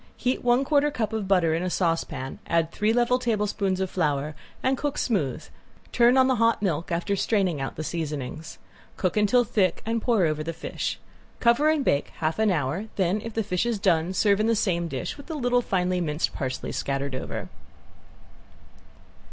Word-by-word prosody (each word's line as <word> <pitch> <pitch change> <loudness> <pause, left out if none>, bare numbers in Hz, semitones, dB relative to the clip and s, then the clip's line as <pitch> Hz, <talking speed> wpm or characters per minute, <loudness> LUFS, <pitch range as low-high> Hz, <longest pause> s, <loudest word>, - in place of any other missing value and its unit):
Heat 255 +1 -1
one 245 +2 +3
quarter 295 0 +3
cup 230 -6 -2
of 215 -3 -2
butter 180 -4 +3
in 165 - 0
a 180 - -1
saucepan, 165 -7 -2
add 165 -1 +1
three 210 +1 +1
level 245 +2 +2
tablespoons 210 -5 0
of 190 - 0
flour, 150 -3 0 0.3
and 260 +1 +2
cook 290 +2 -3
smooth, 160 - -1 0.5
turn 240 +2 +5
on 260 - +6
the 260 -1 +2
hot 230 0 +3
milk 170 -4 -1
after 175 +4 0
straining 190 -7 +1
out 135 - -4
the 155 - -4
seasonings. 155 -1 -5 0.4
Cook 185 - 0
until 215 +4 +4
thick 195 -5 0
and 225 +1 -1
pour 225 -7 +2
over 155 -1 0
the 165 +2 -4
fish. - - -4 0.4
Cover 235 +6 +4
and 310 -3 +1
bake 140 - +2
half 160 +5 -2
hour, 180 -3 +1
then 190 +2 +1
if 225 0 -7
the 225 - +1
fish 180 +3 -1
is 235 -2 0
done 175 -3 +2
serve 200 +1 +2
in 215 - +2
the 230 - +3
same 175 -5 0
dish 135 - -4
with 285 - -12
little 245 -6 +1
finely 180 -4 0
minced 150 -1 -1
parsley 130 -3 -4
scattered 140 0 -2
over. 130 - -4
195 Hz, 185 wpm, -26 LUFS, 165-230 Hz, 0.5 s, on